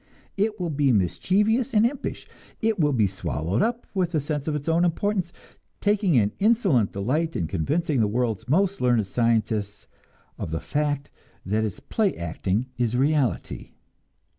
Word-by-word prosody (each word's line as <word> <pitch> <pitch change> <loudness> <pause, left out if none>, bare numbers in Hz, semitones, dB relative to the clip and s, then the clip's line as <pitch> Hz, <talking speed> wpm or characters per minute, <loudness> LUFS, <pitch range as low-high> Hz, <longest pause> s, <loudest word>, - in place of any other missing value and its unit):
It 215 +1 0
will 175 -3 -2
be 140 -2 +2
mischievous 210 - +1
and 215 +2 +5
impish; 265 +3 -3 0.3
it 220 -3 0
will 150 -2 +3
be 115 -6 +3
swallowed 95 +1 -2
up 235 +1 0
with 180 -3 0
a - - +3
sense 145 0 -3
of 155 - 0
its 145 0 -5
own 165 +1 +3
importance, 180 +1 0 0.5
taking 205 - +2
an 105 -2 +3
insolent 195 - +3
delight 145 +11 -1
in 85 - -1
convincing 145 - 0
the 110 - +3
world's 115 -1 -2
most 195 +6 +2
learned 120 -4 +3
scientists 110 -2 0 0.5
of - - -4
the 80 +1 -2
fact 145 -1 -2 0.3
that 105 +4 0
its 105 -4 -3
play 215 -4 0
acting 95 +7 -2
is 120 0 +1
reality. 135 - 0
145 Hz, 160 wpm, -25 LUFS, -, 0.5 s, and